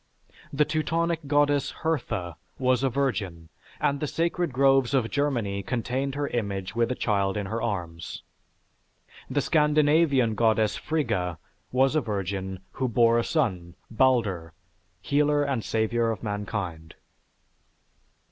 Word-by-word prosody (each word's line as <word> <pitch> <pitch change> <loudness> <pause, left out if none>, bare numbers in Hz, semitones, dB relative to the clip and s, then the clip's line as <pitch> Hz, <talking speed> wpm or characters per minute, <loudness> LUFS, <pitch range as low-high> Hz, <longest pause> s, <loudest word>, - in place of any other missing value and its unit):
The 150 +1 +2
Teutonic 165 0 -1
Goddess 145 -1 +2
Hertha, 110 - -2 0.2
was 130 -1 +2
a 135 - +2
virgin, 100 -11 -2 0.3
and 140 0 +1
the 150 - -2
sacred 170 +1 -1
groves 135 0 +3
of 120 -4 +1
Germany 120 -9 0
contained 130 +5 -2
her 145 0 -1
image 100 -4 -3
with 115 +1 +1
a - - -1
child 100 -4 0
in 100 - -2
her 110 +4 -3
arms. 85 -7 -4 1.1
The - - +1
Scandinavian 150 -5 +3
Goddess 110 -1 +2
Frigga 90 - -1 0.3
was 135 +3 +3
a 155 - +3
virgin 95 -3 -3
who 130 - -2
bore 115 0 +4
a - - +1
son, 95 - -1 0.2
Balder, 110 -10 +1 0.5
healer 145 0 +2
and 135 -6 -1
savior 115 +1 0
of 115 -2 -4
mankind. 100 -6 -4
120 Hz, 130 wpm, -26 LUFS, 100-140 Hz, 1.1 s, bore